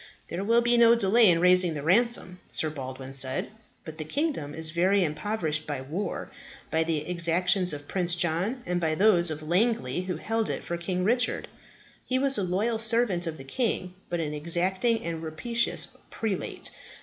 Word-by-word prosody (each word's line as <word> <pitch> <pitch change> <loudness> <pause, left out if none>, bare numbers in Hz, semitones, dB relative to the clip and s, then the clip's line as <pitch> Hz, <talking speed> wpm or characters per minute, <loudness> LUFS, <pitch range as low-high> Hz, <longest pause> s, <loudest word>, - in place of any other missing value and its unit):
"There 180 +3 -4
will 230 +3 +3
be 240 0 +3
no 235 0 +6
delay 225 0 +5
in 165 -1 +3
raising 180 -1 +4
the 145 - -5
ransom," 190 0 +1
Sir 155 - 0
Baldwin 130 -2 -7
said. 130 +4 +1 0.3
"But 160 0 -9
the - - -2
kingdom 265 - -3
is 160 -1 +2
very 185 +4 +2
impoverished 160 -1 -2
by 145 -3 -3
war, 170 +8 -5 0.4
by 160 0 +2
the 155 -2 -2
exactions 180 +2 +2
of 145 -1 -7
Prince 180 -2 0
John, 180 +9 -1
and 175 0 -1
by 160 -1 0
those 180 -3 +4
of 155 0 -5
Langley, 180 - 0
who 185 -1 -4
held 225 +5 -2
it - - -4
for 170 - -4
King 180 +1 -2
Richard. 245 +5 0 0.6
He 255 - -1
was 270 +1 +2
a - - 0
loyal 210 +6 -1
servant 225 -6 +2
of 160 -1 -4
the 135 - -10
king, 185 - -2 0.2
but 175 - -2
an 150 -2 -3
exacting 185 +9 +1
and 165 -1 -4
rapacious 230 +10 -1 0.2
prelate. 215 -4 -3
180 Hz, 180 wpm, -27 LUFS, 160-220 Hz, 0.6 s, no